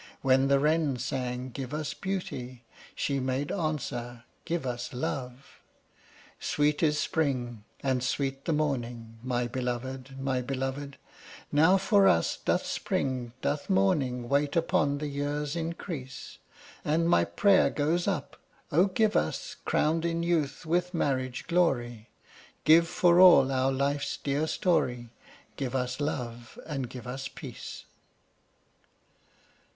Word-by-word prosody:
When 135 0 +4
the 140 0 +4
wren 150 -2 +2
sang, 125 0 -3
"Give 135 +3 -5
us 155 -1 -3
beauty!" 130 -10 -5 0.3
She 140 -1 -1
made 130 +2 -1
answer, 125 -8 -3 0.2
"Give 170 -4 -2
us 125 0 -4
love!" 125 0 -5 0.8
Sweet 150 0 +1
is 150 -2 +3
spring, 125 -9 -1 0.2
and 130 -2 +1
sweet 135 +1 -2
the - - 0
morning, 120 -7 -2
my 125 -1 -1
belovèd, 130 +2 -4
my 135 -1 -1
belovèd; 135 +2 -4 0.6
Now 160 +6 +5
for 200 0 +4
us 85 - +3
doth - - +1
spring, 125 -3 -2
doth 145 - -1
morning, 120 +6 +1
wait 140 +2 +1
upon 165 -4 +2
the 150 - -4
year's 145 +1 -2
increase, 165 -5 -6 0.4
And 165 +3 +1
my 175 - +4
prayer 200 -2 +4
goes 165 +5 0
up, 195 - -2 0.3
"Oh, 175 +6 +4
give 210 +3 +1
us, 80 - -1
crowned 160 +2 +1
in 170 0 -1
youth 165 -2 0
with 175 +2 0
marriage 130 -5 -1
glory, 120 -10 0 0.5
Give 165 +2 +6
for 175 0 +4
all 175 -8 +8
our 130 0 +2
life's 140 +1 -1
dear 145 +2 -1
story, 125 -10 0 0.5
Give 135 -2 -3
us 125 0 -1
love, 120 -5 -4
and 135 -6 -4
give 125 -2 -9
us 135 +2 -4
peace!" - - -9
140 Hz, 130 wpm, -29 LUFS, 125-160 Hz, 0.8 s, all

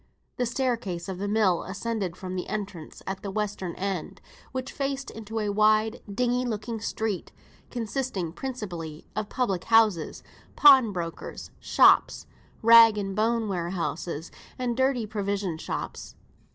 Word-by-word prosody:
The 245 - 0
staircase 230 -9 -2
of 190 -2 -5
the 200 - -2
mill 205 -4 +2
ascended 200 -2 -3
from 185 -1 -6
the 180 - -3
entrance 195 -7 -6
at 190 0 -4
the 200 - -5
western 200 -3 -3
end, 190 -3 -4 0.3
which 260 +1 -4
faced 275 0 -3
into 225 0 -7
a 210 -2 0
wide 215 +2 +3
dingy 245 +3 +1
looking 225 -1 -3
street, 220 -3 -3 0.4
consisting 230 -7 -3
principally 175 - -6
of 215 -1 -3
public 195 -9 -1
houses, 220 -8 +3 0.3
pawn 265 -6 +7
brokers' 170 -3 -6
shops, - - +4 0.4
rag 230 -1 +8
and 195 -1 -3
bone 225 +1 +1
warehouses, 170 -3 -3 0.3
and 245 -2 -1
dirty 260 -2 +1
provision 200 -5 -2
shops. - - -5
210 Hz, 135 wpm, -27 LUFS, 185-230 Hz, 0.4 s, rag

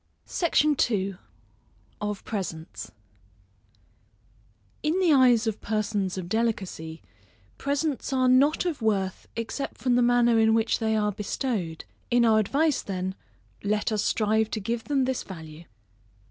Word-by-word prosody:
SECTION 305 -3 +2
II. 195 -3 -1 0.9
Of 210 -1 -4
Presents. 170 -6 -5 1.9
In 315 +5 +1
the 350 -5 +4
eyes 250 -4 +5
of 220 -2 -2
persons 205 -3 -1
of 180 -2 -4
delicacy, 190 -7 -2 0.6
presents 285 -1 -1
are 260 -1 +2
not 275 +7 +4
of 330 -8 -2
worth, 195 -4 -1
except 230 +5 -4
from 250 -2 +1
the 245 - +4
manner 240 -1 +4
in 220 0 +4
which 225 0 +1
they 220 -1 +1
are 210 -1 +1
bestowed; 200 - -3 0.2
in 240 -1 +4
our 220 -1 +5
advice, 290 +8 +1
then, 185 -1 -3 0.5
let 210 +2 0
us 210 -1 0
strive 220 0 +1
to 220 - -3
give 230 +3 -3
them 275 -3 +1
this 260 -1 -1
value. 160 -3 -10
220 Hz, 135 wpm, -26 LUFS, 200-255 Hz, 1.9 s, eyes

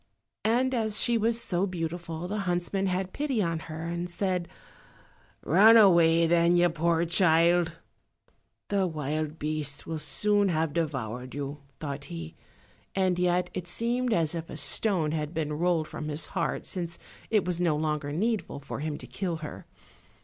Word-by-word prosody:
And 250 +4 +2
as 220 -3 0
she 240 - +2
was 230 +1 +2
so 185 -3 +1
beautiful 170 -1 -4
the 210 +3 -3
huntsman 185 +1 -1
had 185 0 -2
pity 280 -5 -1
on 165 -4 0
her 160 0 -7
and 170 +1 -3
said, 180 -1 -1 1.0
"Run 210 +8 +7
away, 170 -5 +6
then, 170 +1 +4
you 175 0 +5
poor 165 +1 +1
child." 170 0 +3 0.9
"The 195 -2 +2
wild 155 0 -3
beasts 150 -2 -2
will 160 -1 -4
soon 205 +6 +2
have 160 -3 0
devoured 130 -6 -3
you," 145 +1 -4 0.2
thought 140 -2 -5
he, 85 - -7 0.6
and 185 -2 +1
yet 180 0 +1
it 180 -1 -5
seemed 240 +6 0
as 165 -6 +2
if 165 -1 -5
a - - -7
stone 160 +1 0
had 155 0 -3
been 155 -2 -1
rolled 165 0 +1
from 150 - -6
his 150 +1 0
heart - - -1
since 170 -2 -3 0.3
it 210 -5 +2
was 180 -1 -1
no 170 -4 +2
longer 150 -1 -1
needful 210 +2 -1
for 140 - -6
him 150 0 -3
to - - -9
kill 180 -4 -3
her. - - -9
170 Hz, 165 wpm, -28 LUFS, 155-190 Hz, 1.0 s, Run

